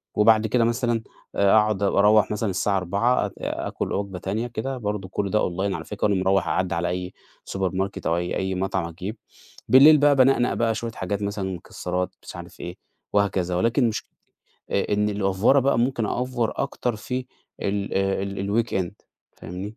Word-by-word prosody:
وبعد 110 Hz, +1 st, +5 dB
كده 120 Hz, +2 st, +2 dB
مثلًا 120 Hz, -1 st, 0 dB, 0.3 s
أقعد 105 Hz, 0 st, +3 dB
وأروَّح 105 Hz, +1 st, +4 dB
مثلًا 105 Hz, 0 st, -1 dB
الساعة 95 Hz, +2 st, 0 dB
16:00 100 Hz, +7 st, +1 dB
آ -, -, -5 dB, 0.4 s
آكل -, -, -3 dB
وجبة 100 Hz, -2 st, -3 dB
تانية 110 Hz, +6 st, -2 dB
كده 125 Hz, +3 st, -4 dB
برضه 105 Hz, -4 st, -3 dB
كل 100 Hz, +1 st, -2 dB
ده 105 Hz, -, +3 dB
online 95 Hz, +2 st, -1 dB
على -, -, -6 dB
فكرة، 105 Hz, 0 st, -1 dB
وأنا 100 Hz, -2 st, +1 dB
مروح 95 Hz, +1 st, +2 dB
أعدي 95 Hz, -2 st, 0 dB
على 85 Hz, +1 st, -1 dB
أي 90 Hz, +1 st, -4 dB, 0.4 s
supermarket 95 Hz, +1 st, -2 dB
أو 85 Hz, -, +2 dB
أي 90 Hz, 0 st, -2 dB
أي 95 Hz, 0 st, -1 dB
مطعم 95 Hz, -2 st, -1 dB
أجيب، 95 Hz, +7 st, -6 dB, 0.5 s
بالليل 145 Hz, +4 st, +8 dB
بقى 145 Hz, 0 st, +4 dB
بانقنق 130 Hz, -2 st, +4 dB
بقى 115 Hz, -1 st, +1 dB
شوية 115 Hz, +1 st, -4 dB
حاجات، 100 Hz, 0 st, -3 dB
مثلًا 100 Hz, -2 st, -2 dB
مكسرات، 90 Hz, +2 st, -3 dB
مش -, -, -9 dB
عارف -, -, -10 dB
إيه 85 Hz, +1 st, -6 dB, 0.4 s
وهكذا، 95 Hz, -3 st, +1 dB
ولكن 115 Hz, +5 st, +2 dB
مش 110 Hz, -, -4 dB, 0.7 s
إ 100 Hz, -, 0 dB
إن 105 Hz, +1 st, +2 dB
الأفورة 100 Hz, +6 st, +3 dB
بقى، 135 Hz, -2 st, +2 dB
ممكن 120 Hz, -2 st, +1 dB
أأفور 120 Hz, -2 st, -1 dB
أكتر 125 Hz, -4 st, -2 dB
في 125 Hz, +4 st, -4 dB, 0.4 s
ال 100 Hz, 0 st, -2 dB
آآ 95 Hz, 0 st, +1 dB
ال 100 Hz, +3 st, -1 dB
الweekend 95 Hz, -3 st, -2 dB, 0.4 s
فاهمني؟ 95 Hz, +5 st, -7 dB
100 Hz, 175 wpm, -24 LUFS, 95-115 Hz, 0.7 s, بالليل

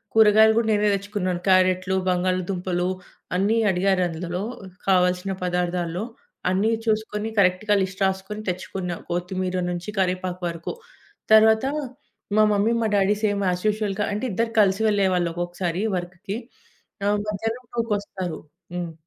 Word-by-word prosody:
కూరగాయలు 220 Hz, 0 st, +7 dB
కూడా 230 Hz, -1 st, +2 dB
నేనే 210 Hz, 0 st, +3 dB
తెచ్చుకున్నాను. 195 Hz, -3 st, -3 dB
క్యారెట్లు, 185 Hz, 0 st, +3 dB
బంగాళాదుంపలు 180 Hz, 0 st, 0 dB, 0.5 s
అన్నీ 205 Hz, +4 st, +2 dB
అడిగారు. 185 Hz, 0 st, +2 dB
అందులో 175 Hz, +3 st, -4 dB, 0.4 s
కావాల్సిన 180 Hz, 0 st, +2 dB
పదార్థాల్లో 180 Hz, 0 st, -1 dB, 0.5 s
అన్నీ 200 Hz, +5 st, +2 dB
చూసుకొని, 215 Hz, 0 st, -1 dB
కరెక్ట్‌గా 195 Hz, +2 st, +3 dB
లిస్ట్ 190 Hz, +1 st, -3 dB
రాసుకొని 190 Hz, +3 st, -3 dB
తెచ్చుకున్నా. 180 Hz, -1 st, -4 dB
కొత్తిమీర 180 Hz, +1 st, -2 dB
నుంచి 175 Hz, +2 st, -5 dB
కరివేపాకు 185 Hz, 0 st, -1 dB
వరకు. 170 Hz, 0 st, -5 dB, 0.6 s
తర్వాత 220 Hz, +2 st, +6 dB, 0.7 s
మా 215 Hz, -, +7 dB
మమ్మీ, 205 Hz, +3 st, +2 dB
మా -, -, +2 dB
డ్యాడీ 200 Hz, +1 st, +3 dB
సేమ్ 205 Hz, -1 st, +1 dB
యాజ్ 180 Hz, +2 st, -2 dB
యూజువల్‌గా 210 Hz, -1 st, -1 dB
అంటే 210 Hz, +5 st, -2 dB
ఇద్దరూ 230 Hz, +4 st, -1 dB
కలిసి 195 Hz, +1 st, +2 dB
వెళ్లేవాళ్లు. 185 Hz, -4 st, +2 dB
ఒక్కోసారి 175 Hz, +2 st, -3 dB
వర్క్‌కి 185 Hz, +4 st, -5 dB, 0.7 s
ఆహ్, 205 Hz, 0 st, +3 dB
మధ్యాహ్నం 225 Hz, +4 st, -3 dB
2కి 230 Hz, -2 st, 0 dB
వస్తారు. 185 Hz, -5 st, -5 dB, 0.4 s
హ్మ్. 175 Hz, -2 st, -4 dB
190 Hz, 125 wpm, -24 LUFS, 180-210 Hz, 0.7 s, కూరగాయలు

